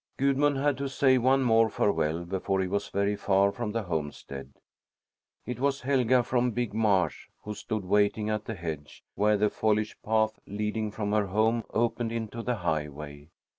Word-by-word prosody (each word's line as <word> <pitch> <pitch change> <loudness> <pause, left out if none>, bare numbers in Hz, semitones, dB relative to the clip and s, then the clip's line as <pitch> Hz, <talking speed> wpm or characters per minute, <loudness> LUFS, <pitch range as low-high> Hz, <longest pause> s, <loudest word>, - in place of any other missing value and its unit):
Gudmund 140 +1 +2
had 140 0 +1
to 140 -1 -2
say 130 -1 +3
one 130 +2 +3
more 115 -2 +4
farewell 85 -5 0
before 95 +2 -1
he 95 - +1
was 100 +2 -2
very 100 +1 0
far 100 0 +2
from 115 0 -4
the 115 0 -2
homestead. 75 -5 -5 0.9
It 125 -1 -5
was 140 +1 0
Helga 130 -2 +3
from 125 0 +1
Big 120 -3 -2
Marsh, 105 -4 +1 0.2
who 105 - -5
stood 105 -1 -4
waiting 105 +2 +2
at 110 0 -2
the 115 - -4
hedge, 80 -5 -7
where 105 0 +2
the 105 +1 +2
foliage 110 0 0
path 110 0 +1
leading 105 +1 -2
from 105 -1 -3
her 105 -1 +2
home 110 +4 +1
opened 115 0 0
into 115 0 -4
the 125 +1 -1
highway. 75 -4 -4
105 Hz, 170 wpm, -28 LUFS, 95-120 Hz, 0.9 s, more